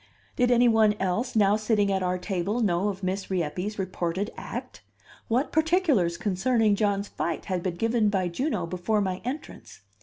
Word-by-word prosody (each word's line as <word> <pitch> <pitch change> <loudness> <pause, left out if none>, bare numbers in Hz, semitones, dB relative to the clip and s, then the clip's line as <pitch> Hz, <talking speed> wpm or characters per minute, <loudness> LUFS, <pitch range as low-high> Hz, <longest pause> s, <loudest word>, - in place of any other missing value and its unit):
Did 245 -1 +2
any 245 0 +5
one 220 -2 +4
else 205 +7 -1
now 205 -1 +4
sitting 215 -2 +1
at 190 -1 0
our 180 0 0
table 190 +4 -2
know 190 -2 +1
of 195 -1 -4
Miss 190 +1 -2
Rieppe's 185 +3 -2
reported 185 +1 -2
act? - - -7 0.5
What 250 +6 0
particulars 315 - +2
concerning 215 +2 +1
John's 200 -1 0
fight - - -3
had 185 -3 -2
been 175 -1 -2
given 225 +2 +1
by 190 -3 0
Juno 195 - -2
before 185 +5 -1
my 185 -2 -2
entrance? 260 - -7
205 Hz, 170 wpm, -26 LUFS, 185-225 Hz, 0.5 s, any